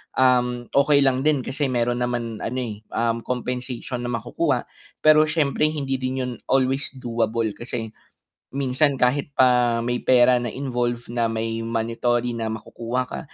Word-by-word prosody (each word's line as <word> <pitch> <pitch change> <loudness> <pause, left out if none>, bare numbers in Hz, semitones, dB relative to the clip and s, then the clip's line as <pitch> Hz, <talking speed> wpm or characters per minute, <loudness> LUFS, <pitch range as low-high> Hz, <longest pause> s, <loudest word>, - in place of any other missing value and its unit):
um, 125 -1 +3
okey 140 0 +4
lang 130 +1 +2
din 145 -4 +3
kasi 140 +2 -2
meron 120 -1 0
naman 120 -2 -2
ano 130 +2 -3
eh, 110 -4 -5
um, 115 0 0
compensation 125 0 -3
na 120 - -2
makukuha. 115 - -1 0.4
Pero 155 0 +7
siyempre 150 -1 +1
hindi 140 -3 -2
din 130 0 -2
yun 125 - -3 0.2
always 135 +1 +2
doable 115 -3 -1
kasi 115 -2 -5 0.7
minsan 140 +1 +2
kahit 135 +3 +1
pa 125 -2 +4
may 120 +1 -1
pera 125 0 +5
na 120 - -3
involve 120 -2 -2
na 120 -1 +1
may 115 0 -2
monetary 115 +1 0
na 115 -1 -3
makukuha 115 +3 -3
ka, - - -6
125 Hz, 155 wpm, -23 LUFS, 115-130 Hz, 0.7 s, Pero